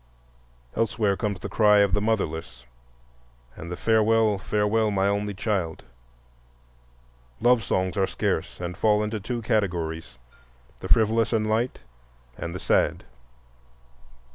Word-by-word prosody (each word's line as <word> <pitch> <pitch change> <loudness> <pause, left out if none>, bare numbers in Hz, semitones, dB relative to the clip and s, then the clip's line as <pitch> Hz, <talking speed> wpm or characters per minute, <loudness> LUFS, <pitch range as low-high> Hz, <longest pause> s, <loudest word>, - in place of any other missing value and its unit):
Elsewhere 110 -3 +1
comes 100 -1 -3
the - - -4
cry 105 -2 +4
of 100 -2 +2
the 105 - +2
"motherless" 80 - -2 0.9
and 85 +2 -8
the 90 - -4
"Farewell, 110 -1 +3
farewell, 105 +2 +1
my 100 -1 +1
only 100 0 -1
child." 95 -6 -2 1.6
Love 120 -1 +3
songs 95 -1 -1
are 95 -1 +1
scarce - - -2
and 90 0 -5
fall 105 +3 +2
into 105 0 -3
two 120 +3 -4
categories—the 80 - -4
frivolous 115 0 +3
and 110 -2 +1
light, 115 - -1 0.5
and 85 +1 -6
the - - -4
sad. - - +1
105 Hz, 120 wpm, -25 LUFS, 90-110 Hz, 1.6 s, cry